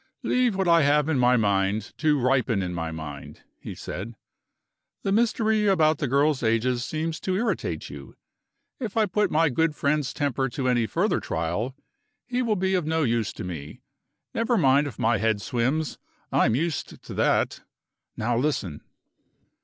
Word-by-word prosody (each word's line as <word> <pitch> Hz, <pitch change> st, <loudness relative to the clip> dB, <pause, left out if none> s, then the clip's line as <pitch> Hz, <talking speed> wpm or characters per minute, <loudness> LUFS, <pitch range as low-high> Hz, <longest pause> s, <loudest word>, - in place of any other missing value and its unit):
"Leave 250 Hz, -4 st, +2 dB
what 190 Hz, -1 st, 0 dB
I 170 Hz, -1 st, +6 dB
have 145 Hz, +1 st, +3 dB
in 145 Hz, -5 st, +1 dB
my 125 Hz, 0 st, +4 dB
mind 100 Hz, 0 st, 0 dB
to 150 Hz, -2 st, +2 dB
ripen 125 Hz, -5 st, +1 dB
in 90 Hz, -1 st, -3 dB
my 80 Hz, -1 st, -3 dB
mind," 75 Hz, -3 st, -8 dB, 0.2 s
he -, -, -8 dB
said. 110 Hz, +6 st, -6 dB, 0.9 s
"The 195 Hz, -, 0 dB
mystery 220 Hz, -1 st, +2 dB
about 160 Hz, -5 st, +3 dB
the 140 Hz, -, -1 dB
girls' 140 Hz, +2 st, +2 dB
ages 120 Hz, +2 st, +1 dB
seems 155 Hz, +3 st, -3 dB
to 185 Hz, -, -2 dB
irritate 225 Hz, +5 st, -2 dB
you. -, -, -10 dB, 0.6 s
If 230 Hz, -5 st, -4 dB
I 220 Hz, -, +4 dB
put 205 Hz, +1 st, +1 dB
my 160 Hz, 0 st, +3 dB
good 160 Hz, +3 st, +1 dB
friend's 145 Hz, -1 st, 0 dB
temper 135 Hz, -2 st, -1 dB
to 130 Hz, +1 st, -3 dB
any 120 Hz, -3 st, +2 dB
further 180 Hz, -, +1 dB
trial, 85 Hz, +11 st, -3 dB, 0.5 s
he 250 Hz, 0 st, -1 dB
will 230 Hz, -4 st, +1 dB
be 190 Hz, 0 st, 0 dB
of 180 Hz, -5 st, 0 dB
no 160 Hz, 0 st, +1 dB
use 115 Hz, -4 st, 0 dB
to -, -, -7 dB
me. 80 Hz, -5 st, -7 dB, 0.5 s
Never 230 Hz, +1 st, +1 dB
mind 140 Hz, -3 st, +4 dB
if 120 Hz, -, -8 dB
my 115 Hz, -2 st, +2 dB
head 110 Hz, 0 st, +1 dB
swims; 135 Hz, +7 st, -1 dB, 0.3 s
I'm 110 Hz, -, +3 dB
used 160 Hz, +2 st, -3 dB
to -, -, -8 dB
that. -, -, +1 dB, 0.6 s
Now 120 Hz, +2 st, 0 dB
listen!" 115 Hz, -, -1 dB
140 Hz, 170 wpm, -25 LUFS, 115-170 Hz, 0.9 s, I